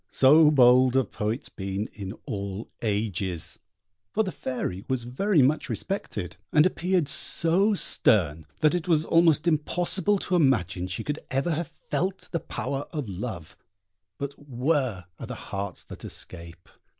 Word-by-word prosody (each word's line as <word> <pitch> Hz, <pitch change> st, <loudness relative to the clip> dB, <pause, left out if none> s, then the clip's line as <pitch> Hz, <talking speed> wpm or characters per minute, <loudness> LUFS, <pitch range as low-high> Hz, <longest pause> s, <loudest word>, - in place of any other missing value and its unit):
So 150 Hz, +3 st, +6 dB
bold 130 Hz, -2 st, +5 dB
have 130 Hz, -4 st, +1 dB
poets 110 Hz, +5 st, -2 dB
been 95 Hz, +1 st, -4 dB
in 100 Hz, -2 st, -6 dB
all 100 Hz, +1 st, -5 dB
ages! 100 Hz, -5 st, -1 dB, 0.5 s
For 220 Hz, -, +1 dB
the 190 Hz, -, -3 dB
Fairy 110 Hz, -, -4 dB
was 130 Hz, -2 st, -1 dB
very 145 Hz, -, +2 dB
much 150 Hz, +4 st, +1 dB
respected, 110 Hz, -, -4 dB
and 150 Hz, 0 st, +5 dB
appeared 180 Hz, -3 st, +1 dB
so 185 Hz, +8 st, +2 dB
stern 80 Hz, -, +2 dB
that 155 Hz, 0 st, +4 dB
it 180 Hz, 0 st, -2 dB
was 160 Hz, -2 st, +3 dB
almost 165 Hz, -1 st, +4 dB
impossible 175 Hz, +5 st, +1 dB
to 185 Hz, -, -1 dB
imagine 100 Hz, -, +2 dB
she 90 Hz, -, -4 dB
could 150 Hz, +1 st, -3 dB
ever 135 Hz, +6 st, 0 dB
have 160 Hz, 0 st, -1 dB
felt 185 Hz, +4 st, -4 dB
the 170 Hz, -, 0 dB
power 140 Hz, -2 st, -4 dB
of 150 Hz, -7 st, -4 dB
love; 95 Hz, -4 st, -6 dB, 0.6 s
but 140 Hz, 0 st, -4 dB
where 130 Hz, -, -1 dB
are -, -, -6 dB
the -, -, -5 dB
hearts 100 Hz, -2 st, -5 dB
that -, -, -11 dB
escape? 85 Hz, 0 st, -7 dB
130 Hz, 150 wpm, -26 LUFS, 100-165 Hz, 0.6 s, So